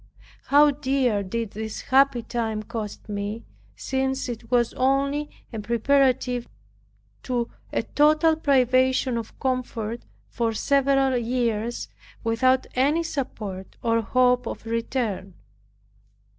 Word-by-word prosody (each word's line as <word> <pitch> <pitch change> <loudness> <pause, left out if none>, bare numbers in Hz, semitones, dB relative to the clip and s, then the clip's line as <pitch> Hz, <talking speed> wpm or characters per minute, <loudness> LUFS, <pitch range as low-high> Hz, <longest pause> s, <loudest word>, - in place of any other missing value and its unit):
How 290 +1 +6
dear 265 -6 0
did 220 +2 -3
this 220 0 -5
happy 265 -2 +3
time 225 -2 -2
cost 220 -2 -6
me, 205 +2 -4 0.3
since 265 0 -2
it 230 -1 -7
was 240 -1 +2
only 275 +3 +1 0.2
a 225 - -3
preparative 250 +2 +1 0.7
to 240 -2 -2 0.2
a - - 0
total 310 +2 +3
privation 260 -3 +2
of 230 -2 -6
comfort 240 -3 -2 0.3
for 230 -2 -1
several 270 +1 +2
years, 235 -1 -1 0.4
without 255 +3 +2
any 290 +6 +2
support, 215 - -5
or 230 0 +2
hope 250 +2 +2
of - - -6
return! 225 -5 -2
245 Hz, 110 wpm, -25 LUFS, 225-270 Hz, 0.7 s, How